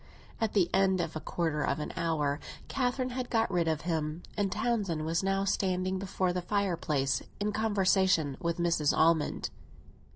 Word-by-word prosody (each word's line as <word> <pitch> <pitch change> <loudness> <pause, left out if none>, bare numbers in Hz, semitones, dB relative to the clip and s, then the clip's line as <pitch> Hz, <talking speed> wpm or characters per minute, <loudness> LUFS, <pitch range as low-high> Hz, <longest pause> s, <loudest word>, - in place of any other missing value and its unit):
At 225 -2 0
the 190 -5 +4
end 190 -1 +3
of 165 -2 -2
a - - -2
quarter 155 -1 -1
of 140 - 0
an 150 - -4
hour 155 -4 0 0.3
Catherine 255 -1 -1
had 250 0 -3
got 225 -3 +1
rid 175 -2 +1
of 160 -1 0
him, 160 -1 -2
and 200 -2 0
Townsend 205 -8 0
was 165 +1 +1
now 195 0 +1
standing 185 -1 0
before 185 -1 -1
the 180 - -1
fireplace 170 -9 0 0.2
in 210 +1 0
conversation 190 -8 +2
with 170 -1 -1
Mrs. 170 -4 +2
Almond. 160 -2 +2
180 Hz, 165 wpm, -30 LUFS, 160-200 Hz, 0.3 s, the